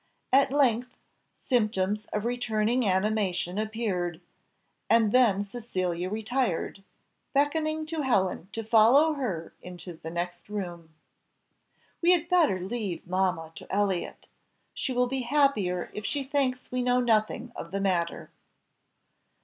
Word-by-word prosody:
At 275 0 +5
length 255 -3 +1 0.5
symptoms 210 -4 +1
of 210 +1 -3
returning 235 -1 0
animation 190 -1 0
appeared, 205 -6 -2 0.7
and 225 -2 +4
then 220 -6 +4
Cecilia 185 -5 -3
retired, 220 -3 -2 0.5
beckoning 310 +2 +1
to 315 0 -3
Helen 190 - +1
to 225 - -4
follow 235 +8 +5
her 205 - -4
into 180 0 -9
the 160 0 -8
next 175 +3 -5
room. 175 -5 -5 1.1
"We 350 +1 +6
had 345 -1 0
better 330 - +3
leave 195 -1 -4
mamma 180 -3 0
to - - -11
Elliott, 195 -3 -1 0.5
she - - -3
will 250 0 +2
be 265 +1 -2
happier 235 -10 +1
if 210 - -6
she 280 +5 -1
thinks 265 -2 -1
we 250 0 0
know 250 0 +2
nothing 225 0 +1
of 170 - -7
the 195 +3 -3
matter." 180 -4 -1
215 Hz, 125 wpm, -28 LUFS, 185-255 Hz, 1.1 s, We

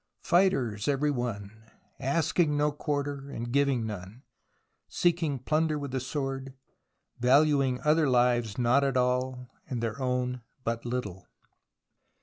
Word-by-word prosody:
Fighters, 135 - +2
every 145 +1 +2
one, 115 -6 -3 0.5
asking 150 +2 +1
no 150 0 +2
quarter, 145 -1 -2 0.3
giving 135 -3 +2
none, 105 +3 -7 0.6
seeking 165 -5 +1
plunder 155 +4 0
with 140 -2 -5
the 130 - -1
sword, 135 0 -4 0.6
valuing 135 0 +3
other 150 -1 +3
lives 120 -4 +2
not 125 +3 +3
at 135 -2 +1
all 125 0 0 0.2
and 125 - -2
their 115 +3 -3
own 125 -1 -1 0.2
but 115 0 -2
little. 105 -7 -4
130 Hz, 120 wpm, -28 LUFS, 120-145 Hz, 0.6 s, valuing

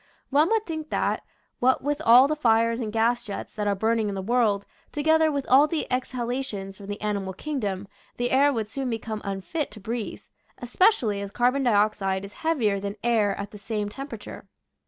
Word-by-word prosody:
One 300 +5 +4
would 445 -1 +1
think 315 -2 -5
that, - - 0 0.4
what 260 +1 +3
with 290 +2 -1
all 250 +2 +8
the 305 - 0
fires 230 -4 +2
and 220 -3 -3
gas 235 +2 +1
jets 205 -3 -6
that 210 -1 -2
are 200 - +2
burning 220 +1 +1
in 200 - -3
the 190 - -3
world, 215 -3 +2 0.3
together 315 +1 +3
with 280 -2 -2
all 275 +4 +6
the 320 -1 -2
exhalations 245 -5 -3
from 200 - -11
the 205 0 -5
ani 210 -1 0
mal 190 -1 -5
kingdom, 205 -6 -3 0.3
the 245 0 -1
air 280 +2 +5
would 225 -5 -2
soon 265 +3 -4
become 225 -2 -4
unfit 200 - -3
to 215 - -11
breathe, 225 +2 -5 0.3
especially 245 - +2
as 200 - -5
carbon 245 +6 +1
dioxide 205 -4 +1
is 200 - -11
heavier 240 -12 +1
than 200 +1 -4
air 220 -4 +2
at 200 0 -5
the 210 - -10
same 210 -1 -3
temperature. 275 +6 -8
230 Hz, 195 wpm, -25 LUFS, 205-270 Hz, 0.4 s, all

